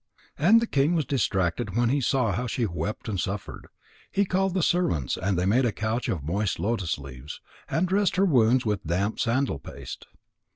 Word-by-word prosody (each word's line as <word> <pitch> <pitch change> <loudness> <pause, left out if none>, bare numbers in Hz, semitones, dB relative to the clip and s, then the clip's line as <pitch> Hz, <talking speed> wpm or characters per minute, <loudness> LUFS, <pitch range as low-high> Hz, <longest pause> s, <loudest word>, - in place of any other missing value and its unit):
And 200 +10 +6
the - - +1
king 150 -3 +2
was 155 -4 +1
distracted 100 -5 -1
when 120 -1 +3
he 140 +2 +1
saw 125 -3 +1
how 120 +7 -2
she 120 +1 -1
wept 85 +2 -4
and 100 -4 -2
suffered. 95 +1 -5 0.4
He 200 +1 +2
called 190 0 0
the 185 - +1
servants 120 - +1
and 95 -1 -1
they 90 - +1
made 115 +7 +3
a 120 - +2
couch 110 +4 -2
of 80 -7 -2
moist 95 +6 -1
lotus 100 -7 -1
leaves, 70 0 -9 0.3
and 175 +3 +1
dressed 195 0 +1
her 190 +2 +3
wounds 125 - +3
with 105 -2 -1
damp 95 +6 -1
sandal 120 - 0
paste. - - -9
115 Hz, 195 wpm, -26 LUFS, 95-145 Hz, 0.4 s, And